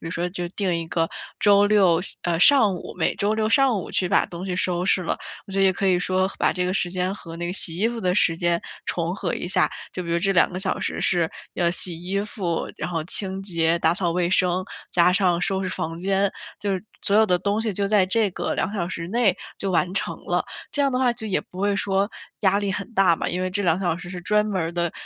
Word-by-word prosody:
如 - - -4
说 175 +2 -2
就 175 -1 -4
定 185 -1 -2
一 165 0 -2
个 165 -1 0 0.3
周 205 -1 +5
六 190 -6 +4
下 - - +1
呃， 170 -1 -1
上 225 -9 +6
午， 175 - -8
每 160 - +1
周 210 +2 0
六 220 0 0
上 260 -3 +3
午 - - -8
去 180 - +1
把 200 - +3
东 175 +1 -7
西 180 -2 -3
收 180 -1 0
拾 190 - +2
了。 - - -1 0.3
我 195 - -10
觉 195 - -1
得 - - +5
也 190 - +4
可 195 +2 -2
以 185 -1 +4
说 185 +1 +1
和 195 - -7
把 - - +3
这 180 -1 -1
个 185 - -1
时 175 -2 0
间 185 +1 -1
和 165 -5 -9
那 175 0 -4
个 175 - -3
洗 170 -4 +3
衣 210 +6 +2
服 235 -1 -5
的 180 -1 0
时 165 -5 +3
间 170 0 +1 0.2
重 170 +1 -2
合 190 -3 -3
一 - - -4
下， 185 0 +3 0.2
就 185 - -4
比 170 - -6
如 170 - +2
这 195 +2 +1
2 180 - +4
个 185 - -3
小 190 -1 -1
时 - - -2
是 170 -3 +1 0.2
要 170 -1 +1
洗 175 -1 0
衣 195 +2 -1
服， 190 -5 -3
然 155 - -4
后 165 -2 -2
清 190 +1 0
洁 170 -3 +1
打 165 0 +2
扫 175 -2 -1
卫 175 0 0
生， 185 0 +2 0.3
加 180 +1 +4
上 180 -3 +2
收 190 +1 0
拾 185 - -2
房 165 -1 -4
间， 195 +1 +1 0.3
就 200 -1 -2
是 190 +2 -3 0.2
所 205 - +2
有 220 - +6
的 180 -3 +2
东 200 +4 -1
西 220 -3 0
就 200 +1 0
在 200 -2 +3
这 215 0 +2
个 - - -3
2 190 - -1
小 175 -5 -2
时 170 -2 -4
内 230 -2 +2 0.2
就 195 - -2
完 180 0 +1
成 - - -1
了。 - - 0 0.3
这 290 - -1
样 275 - +2
的 250 - -1
话 250 -2 +3
就 220 -1 -6
也 200 - 0
不 185 - -11
会 200 0 +1
说 195 +1 0 0.3
压 200 -1 +3
力 200 -1 -1
很 205 +5 -5
大 185 -4 +4
嘛， - - -2
因 180 +1 -2
为 185 - -2
这 200 +2 -1
2 170 -1 +2
小 175 -3 0
时 175 0 -9
是 180 -1 -6
专 210 +3 +1
门 195 -4 -1
儿 165 +1 -3
的， 170 -1 -1
185 Hz, 285 characters per minute, -23 LUFS, 175-200 Hz, 0.3 s, 上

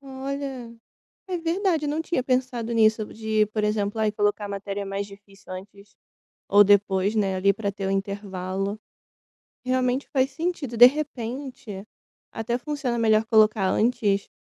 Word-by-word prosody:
Olha, 270 -3 -6 0.5
é 365 -2 -2
verdade, 335 -2 0
não 305 +2 -1
tinha 320 -6 -1
pensado 255 -3 -1
nisso, 220 -1 +3
de 220 0 -1
eh, - - 0
por 215 0 -3
exemplo, 210 0 -1
ai, 215 -1 +2
colocar 205 0 0
a - - -5
matéria 200 0 -4
mais 195 +1 -3
difícil 200 -1 -15
antes 200 +2 -10 0.5
ou 205 +1 +7
depois, 200 0 +3
né, 195 -3 +1
ali 195 +2 +3
pra 200 0 -3
ter 195 -1 -4
o - - 0
intervalo. 195 0 -3 0.9
Realmente 255 +1 0
faz 265 -1 +2
sentido. 300 -4 -3
De 240 - +10
repente, 250 -6 -4 0.4
até 235 +2 -2
funciona 265 -3 -3
melhor 220 -1 +3
colocar 215 -3 +4
antes, 215 -4 +1
220 Hz, 150 wpm, -25 LUFS, 200-255 Hz, 0.9 s, De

